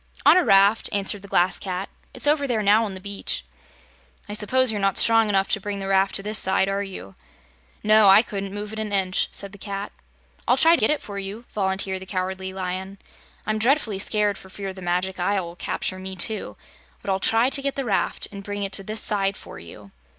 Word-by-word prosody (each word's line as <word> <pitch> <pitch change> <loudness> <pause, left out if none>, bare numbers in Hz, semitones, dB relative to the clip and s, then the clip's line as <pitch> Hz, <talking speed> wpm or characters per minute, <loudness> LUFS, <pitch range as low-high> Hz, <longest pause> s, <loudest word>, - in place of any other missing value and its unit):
"On - - +8
a 365 - +4
raft," 200 0 +4
answered 200 0 0
the 200 - -12
Glass 180 -1 +2
Cat. 185 0 -4 0.2
"It's 255 - -6
over 290 -1 +2
there 225 -4 0
now 210 +3 +4
on 195 -3 -6
the - - -6
beach." 200 +1 -3 0.8
"I 205 - -6
suppose 245 +4 +2
you're 210 -2 -3
not 195 -1 +2
strong 225 -1 +5
enough 195 -1 +1
to 210 - +3
bring 205 +1 -4
the 195 - -5
raft 195 0 +2
to 195 - -2
this 215 +1 0
side, 190 0 +2
are 195 +1 -1
you?" 185 - -8 0.7
"No; 215 0 +5
I 195 +3 +8
couldn't 200 -3 -5
move 205 +1 -6
it 220 - -5
an 215 -1 -4
inch," 190 -2 +1
said 200 -1 -7
the 200 - -12
Cat. 200 0 -5 0.6
"I'll - - +4
try 330 +1 +7
to - - -2
get 220 - +3
it 300 - 0
for 200 -1 -6
you," 200 +5 -7
volunteered 190 -1 -2
the 190 - -9
Cowardly 190 0 -3
Lion. 190 +1 -5 0.5
"I'm 215 0 -1
dreadfully 230 -4 +1
scared 210 0 +1
for 190 - -14
fear 195 0 -6
the 190 - -11
Magic 180 +2 -2
Isle 190 +1 0
will 170 0 -9
capture 185 +1 -3
me, 190 0 -6
too; 210 +4 -1 0.5
but 195 - -2
I'll 190 - 0
try 230 +6 +3
to 275 - +1
get 275 0 -2
the 275 - -3
raft 205 -4 -1
and 200 -1 -8
bring 205 0 -4
it 195 - -3
to 195 - -2
this 215 +2 -2
side 195 -2 0
for - - -11
you." 100 +4 -13
200 Hz, 230 wpm, -23 LUFS, 190-215 Hz, 0.8 s, On